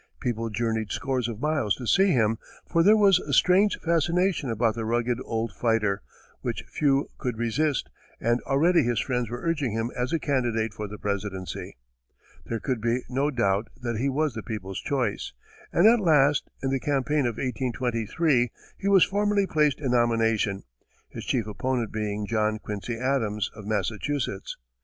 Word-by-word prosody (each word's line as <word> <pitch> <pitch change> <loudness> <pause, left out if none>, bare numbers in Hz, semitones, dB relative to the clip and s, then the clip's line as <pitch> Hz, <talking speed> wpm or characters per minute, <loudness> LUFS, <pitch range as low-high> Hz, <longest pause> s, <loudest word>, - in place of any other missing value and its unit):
People 115 -3 -2
journeyed 110 0 -1
scores 130 -4 -1
of 115 -3 -5
miles 145 -7 +1
to 125 - -7
see 195 - +4
him, 115 - +2 0.3
for 170 - +2
there 210 +5 +6
was 195 -3 +5
a 145 - -5
strange 185 +8 +4
fascination 170 -2 +1
about 115 0 +1
the 115 0 -4
rugged 120 +2 0
old 115 -1 -2
fighter 110 -4 +1 0.4
which - - -3
few 140 -1 +1
could 125 -4 -3
resist, 125 +5 0 0.3
and 120 +1 +1
already 165 +6 +4
his 120 -3 0
friends 125 -3 -1
were 120 +1 -6
urging 150 -9 0
him 115 +2 -2
as 125 +1 -2
a 165 - +2
candidate 120 -7 0
for 105 -1 -5
the 105 +1 -8
presidency. 100 - -4 0.7
There 115 - -2
could 125 -2 -2
be 120 +2 0
no 135 +3 +1
doubt 105 -5 +1
that 120 -2 -3
he 135 +5 0
was 150 0 0
the 115 - -5
people's 100 -4 -5
choice, 125 -7 -2 0.4
and 170 - +3
at 230 +2 +7
last, 150 -6 +3
in 135 - 0
the 135 - +1
campaign 140 0 +1
of 115 - -2
1823, 125 +2 0 0.3
he 200 - -3
was 195 -3 +6
formally 205 0 +1
placed 150 -5 +2
in 135 -4 -1
nomination, 115 -4 +1 0.5
his - - -8
chief 120 -5 +1
opponent 120 +2 -2
being 105 -1 -2
John 110 0 0
Quincy 110 +2 -5
Adams, 115 -5 0
of 105 -2 -10
Massachusetts. 110 +2 -2
120 Hz, 170 wpm, -26 LUFS, 110-145 Hz, 0.7 s, at